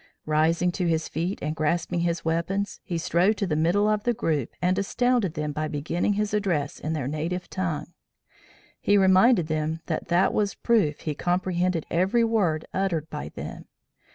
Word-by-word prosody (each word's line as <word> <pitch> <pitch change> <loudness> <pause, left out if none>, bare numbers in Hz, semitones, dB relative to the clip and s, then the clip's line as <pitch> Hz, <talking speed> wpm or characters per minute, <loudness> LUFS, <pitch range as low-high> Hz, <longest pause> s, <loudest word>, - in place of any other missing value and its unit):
Rising 160 +3 +2
to 180 0 -1
his 160 -1 0
feet 170 +5 -2
and 155 +1 -2
grasping 170 +2 0
his 170 -1 -1
weapons, 170 +5 -1
he 175 - -3
strode 180 +6 +2
to 200 - 0
the 160 -5 -1
middle 175 +7 +2
of 210 -1 +1
the 240 -1 +1
group 150 - -1
and 185 +2 +1
astounded 235 -3 +1
them 150 -1 -2
by 155 +1 -2
beginning 155 +6 -1
his 210 0 -1
address 175 -9 -1
in 155 - -3
their 145 -5 -2
native 165 +5 -3
tongue. 170 -3 -3 0.9
He 205 - +3
reminded 190 +1 +5
them 155 +1 -2
that 160 - -3
that 175 +3 +3
was 205 -1 0
proof 205 -11 +1
he 155 - -2
comprehended 180 0 0
every 190 +8 +2
word 195 -9 +1
uttered 175 -5 -1
by 75 - -5
them. - - -8
175 Hz, 175 wpm, -26 LUFS, 155-195 Hz, 0.9 s, reminded